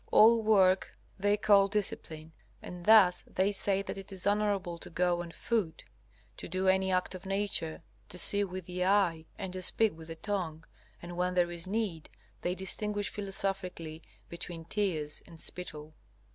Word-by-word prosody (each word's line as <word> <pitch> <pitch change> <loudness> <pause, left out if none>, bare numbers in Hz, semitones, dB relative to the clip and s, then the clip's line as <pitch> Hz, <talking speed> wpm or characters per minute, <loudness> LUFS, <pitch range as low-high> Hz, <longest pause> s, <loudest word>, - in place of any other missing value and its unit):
All 230 +1 +6
work 195 -4 +2 0.2
they 205 +2 +2
call 200 -1 +4
discipline, 165 -6 -4 0.3
and 175 -1 -10
thus 210 -5 +5
they 190 +2 0
say 195 -1 +1
that 195 - -6
it 195 - -11
is 190 -1 -3
honorable 200 -4 -1
to - - -7
go 175 0 0
on 175 - -8
foot, 175 -3 -3 0.5
to - - -7
do 185 +2 -2
any 190 0 +2
act 185 0 -1
of 185 +1 -9
nature, 195 -5 -2 0.3
to 180 - 0
see 200 +3 +10
with 185 -2 -6
the 180 0 -3
eye, 180 -4 +1
and 190 -3 -6
to 185 - -4
speak 215 +1 +1
with 160 0 -12
the 165 - -7
tongue; 165 -4 -4 0.4
and 175 0 -8
when 180 0 -1
there 175 -1 +1
is 170 0 -3
need, 195 -6 -3 0.3
they 180 +1 -2
distinguish 205 +2 -1
philosophically 195 -5 -3 0.3
between 170 -1 -7
tears 170 -6 -2
and 165 - -14
spittle. 155 -4 -5
185 Hz, 170 wpm, -30 LUFS, 170-200 Hz, 0.5 s, see